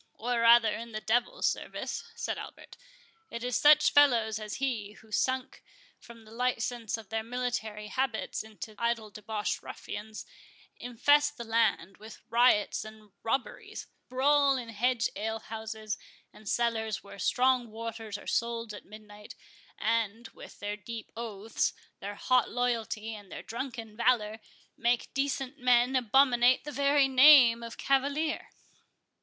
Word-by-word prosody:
"Or 240 +1 -1
rather 230 -1 +6
in 230 0 -7
the 215 - -3
devil's 240 +3 0
service," - - -3
said 470 - -3
Albert. - - -11 0.5
"It 235 - -6
is 250 -1 -1
such 300 0 +6
fellows 230 -7 +4
as 215 -1 -6
he, 230 -7 -2
who, 220 0 -19
sunk 260 +4 -1 0.4
from 230 -1 -14
the 215 - -15
license 240 -1 -2
of 220 -3 -12
their 225 0 -1
military 225 -3 -3
habits 235 +1 -2
into 220 0 -10
idle 235 -2 -1
debauched 210 0 -3
ruffians, 215 +1 -8 0.5
infest 290 +5 +2
the 235 - -5
land 225 -5 0
with 215 0 -12
riots 235 -4 +3
and 215 -1 -13
robberies, 245 +3 -3 0.2
brawl 275 +2 +3
in 240 -2 -6
hedge 235 +2 +1
alehouses 220 0 -5 0.3
and 215 -2 -9
cellars 225 -3 -1
where 200 0 -12
strong 250 +3 +2
waters 225 -1 -6
are - - -13
sold 230 -2 -2
at 205 - -10
midnight, 210 0 -13 0.4
and, 225 0 -1
with - - -13
their 205 0 -4
deep 220 +2 -8
oaths, 220 -2 -2 0.3
their 205 +1 -6
hot 255 +3 +2
loyalty, 225 -2 -2
and 205 -3 -11
their - - -7
drunken 230 -2 -6
valour, 225 -2 +1 0.4
make 240 0 0
decent 275 0 -2
men 250 +1 +3
abominate 255 0 +4
the 295 - -6
very 280 0 +3
name 260 -3 +7
of 230 0 -8
cavalier." 280 +4 0
230 Hz, 140 wpm, -29 LUFS, 220-250 Hz, 0.5 s, name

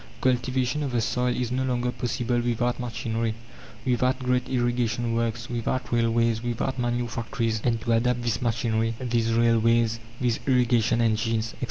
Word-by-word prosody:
Cultivation 130 +2 +1
of 135 -4 -2
the 120 - +2
soil 125 +2 0
is 125 -1 -2
no 130 +1 0
longer 125 -1 0
possible 120 0 -1
without 120 +1 0
machinery, 115 -2 -2 0.5
without 125 +1 +2
great 125 -1 0
irrigation 120 -2 0
works, 115 0 -1
without 120 +2 -2
railways, 115 -1 +2
without 120 +2 -2
manure 120 0 0
factories. 115 -1 -2
And 115 -2 +1
to 115 - -1
adapt 120 +1 +2
this 120 +1 -1
machinery, 115 -1 0
these 120 -3 0
railways, 115 0 +3 0.2
these 120 -3 0
irrigation 120 -3 +3
engines, 115 0 +1
etc. - - -13
120 Hz, 155 wpm, -26 LUFS, 115-125 Hz, 0.5 s, railways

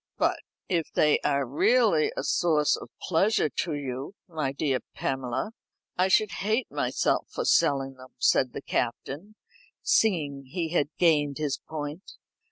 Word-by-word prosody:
"But - - +1 0.3
if 170 -4 -1
they 150 -1 +3
are 140 -1 +1
really 165 - +3
a - - -1
source 155 -4 +2
of - - -9
pleasure 185 0 +2
to 165 +1 -2
you, 135 +4 -5
my 155 -6 -2
dear 135 -2 0 0.2
Pamela, 130 - -2 0.4
I 185 +1 +3
should 210 +1 +3
hate 220 +6 0
myself - - 0
for - - -3
selling 135 - +3
them," 130 -1 -15
said 125 0 +3
the - - -6
Captain, 145 - -3 0.5
seeing 145 -10 +2
he 165 +4 -3
had 155 -4 +1
gained 150 -5 +3
his 150 -2 -2
point. 155 +3 -6
150 Hz, 145 wpm, -27 LUFS, 135-180 Hz, 0.5 s, they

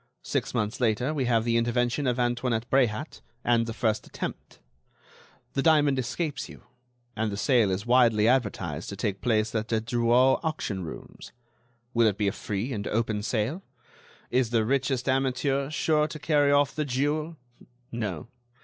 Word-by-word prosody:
Six - - -2
months 110 +1 -1
later 125 +5 +1
we 140 -4 -1
have 115 -2 +2
the 115 0 +1
intervention 120 +4 0
of 125 -1 +1
Antoinette 120 -1 0
Bréhat 130 +2 +1 0.2
and 115 -1 +2
the - - -3
first 110 -2 -1
attempt. - - -7 1.0
The 135 - 0
diamond 145 -3 +4
escapes 145 +4 -3
you, - - -13 0.5
and 110 0 -1
the 100 - -4
sale 120 -3 +3
is 95 +3 -2
widely 120 -3 +4
advertised 100 - 0
to 100 - -5
take 100 -1 -3
place 110 -3 +1
at 110 -1 -1
the 110 -1 +1
Drouot 120 +3 +3
auction 150 - -3
rooms. 80 - -9 0.6
Will 115 -1 +4
it 105 -2 0
be 105 - 0
a - - +2
free 105 +7 -4
and 100 -3 -4
open 110 -2 -1
sale? 115 - -1 0.7
Is 125 -2 +2
the 115 -2 +1
richest 130 0 0
amateur 135 +1 0
sure 155 0 +1
to 155 - -7
carry 145 -2 +2
off 145 -1 +3
the 155 - -1
jewel? 150 +4 -1 0.5
No. 105 -7 -4
120 Hz, 165 wpm, -27 LUFS, 110-135 Hz, 1.0 s, diamond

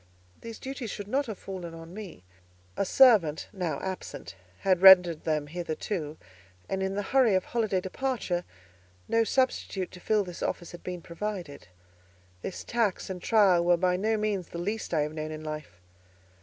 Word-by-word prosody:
These 230 -1 -8
duties 260 -3 -6
should 205 -1 -6
not 275 +5 0
have 215 -4 -5
fallen 180 -4 -7
on 165 +1 -11
me; 195 - -9 0.5
a - - 0
servant, 200 - +5
now 170 -7 -2
absent, 190 - -6 0.3
had 185 -2 +2
rendered 180 -4 +8
them 155 -2 0
hitherto, 160 0 -4 0.5
and 190 - -2
in 190 0 -1
the 205 - -1
hurry 245 -2 +3
of 185 - +1
holiday 220 -5 0
departure, 190 -2 -2 0.6
no 230 0 +3
substitute 225 -6 0
to 180 - -11
fill 210 +3 +1
this 180 -2 -9
office 175 - -3
had 175 - -10
been 180 -2 -6
provided. 175 -5 -6 0.7
This 185 - -5
tax 220 -5 -1
and 180 -1 -6
trial 195 -6 +4
were 175 0 +4
by 180 +1 +2
no 215 +4 +1
means 210 -4 -1
the - - -7
least 205 +6 -3
I 160 -3 +2
have 150 +1 -2
known 155 0 -4
in 155 0 -7
life. 155 - -7
185 Hz, 170 wpm, -28 LUFS, 170-215 Hz, 0.7 s, rendered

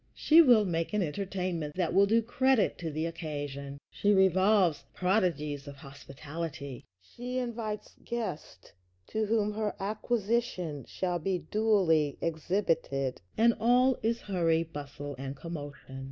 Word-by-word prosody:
She 320 +2 +6
will 240 -8 +6
make 165 +1 -2
an 210 -2 +2
entertainment 180 -2 -3
that 180 -3 0
will 200 +1 +5
do 225 +2 +3
credit 260 0 +2
to 165 - -3
the 155 +1 -2
occasion. 145 -4 -5
She 205 - +1
revolves 190 -2 +4
prodigies 165 -7 0
of 140 - -8
hospitality. 140 0 -7
She 245 - -6
invites 230 -4 -4
guests 210 - -5 0.4
to 220 -1 -1
whom 210 -1 +1
her 215 -1 -2
Acquisition 210 - -1
shall 180 -2 -2
be 180 +2 -2
duly 185 -9 +3
exhibited, 160 - -1 0.2
and 230 +1 +5
all 250 +3 +4
is 230 +2 0
hurry, 165 -4 +1
bustle, 145 -2 -7
and 135 0 -5
commotion. 145 -4 -8
180 Hz, 130 wpm, -30 LUFS, 150-215 Hz, 0.4 s, She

